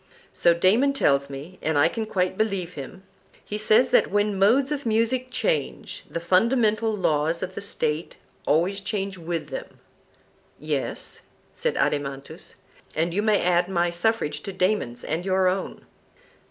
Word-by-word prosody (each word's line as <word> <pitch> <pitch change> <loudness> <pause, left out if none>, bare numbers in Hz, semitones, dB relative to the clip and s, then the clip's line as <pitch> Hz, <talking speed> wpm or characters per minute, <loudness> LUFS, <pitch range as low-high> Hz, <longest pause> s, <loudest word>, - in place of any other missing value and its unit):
So 170 -1 +3
Damon 220 +11 +3
tells 140 - +2
me, 145 +7 -9
and 160 -1 0
I 145 - +5
can 225 -2 -3
quite 185 -3 0
believe 195 -4 -1
him;—he 190 +7 -9
says 215 +4 +4
that - - +4
when 205 0 0
modes 260 +8 +4
of 290 -1 -2
music 230 +3 +1
change, 480 - -2
the 170 - -3
fundamental 220 +5 +2
laws 165 -1 0
of 185 0 -5
the - - -6
State 160 -5 -2 0.3
always 180 +6 +2
change 195 -1 -3
with 170 0 -4
them. - - -7 0.8
Yes, - - -3 0.3
said 480 - -2
Adeimantus; 140 -1 -2 0.4
and 165 +2 0
you 205 - +1
may 215 -1 +2
add 175 0 +2
my 175 -2 +1
suffrage 200 -1 0
to 200 - -6
Damon's 185 - -1
and 165 +2 -2
your 190 0 +2
own. 185 +1 -2
190 Hz, 150 wpm, -24 LUFS, 170-220 Hz, 0.8 s, I